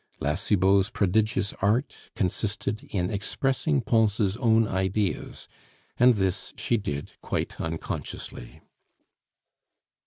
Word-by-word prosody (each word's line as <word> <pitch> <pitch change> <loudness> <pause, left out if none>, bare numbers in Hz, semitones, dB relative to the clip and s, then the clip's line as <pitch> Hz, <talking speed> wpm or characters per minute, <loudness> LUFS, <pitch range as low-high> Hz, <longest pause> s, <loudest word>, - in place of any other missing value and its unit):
La 75 - 0
Cibot's 95 +3 +3
prodigious 105 0 +1
art 110 +8 +1 0.2
consisted 105 +2 -2
in 90 -3 -1
expressing 135 +7 0
Pons' 105 -3 +2
own 115 -2 +3
ideas, 95 +1 -1 0.5
and 125 0 +6
this 95 -2 -1
she 120 - +1
did 75 -10 -3
quite - - -3
unconsciously. 80 -6 -6
105 Hz, 95 wpm, -27 LUFS, 95-115 Hz, 0.5 s, and